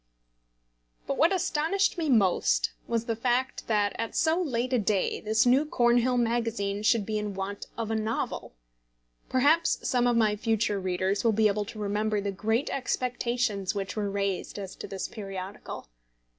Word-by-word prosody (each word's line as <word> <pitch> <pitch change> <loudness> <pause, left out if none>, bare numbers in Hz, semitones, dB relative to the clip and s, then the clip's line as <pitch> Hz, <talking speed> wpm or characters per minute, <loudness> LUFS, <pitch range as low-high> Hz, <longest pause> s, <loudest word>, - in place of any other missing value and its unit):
But 275 - -2
what 330 +4 +5
astonished 375 +1 +1
me 330 -4 -2
most 200 -8 +3 0.2
was 230 -1 -1
the 230 - -1
fact 245 +3 -1
that 205 -2 +1
at 230 - -3
so 325 +2 +2
late 255 -5 -1
a 250 - +4
day 200 -2 0
this 220 +2 +2
new 255 +4 +5
Cornhill 245 -3 +2
Magazine 230 -4 0
should 215 0 +3
be 215 0 -1
in 210 -2 -4
want 195 +1 -5
of 225 -1 -3
a - - 0
novel! 220 - -3 0.7
Perhaps 295 +6 +2
some 245 -1 +2
of 240 -1 +2
my 215 -2 +3
future 210 -1 0
readers 185 +1 -1
will 230 -2 +3
be 215 +1 +4
able 205 0 0
to 220 - -9
remember 210 +1 0
the 200 0 -2
great 220 +7 -1
expectations 240 -6 -1
which 195 -2 -3
were 210 -2 -1
raised 200 -1 -2
as 195 -2 -6
to - - -7
this 195 -1 -4
periodical. 195 - -7
220 Hz, 170 wpm, -28 LUFS, 200-245 Hz, 0.7 s, what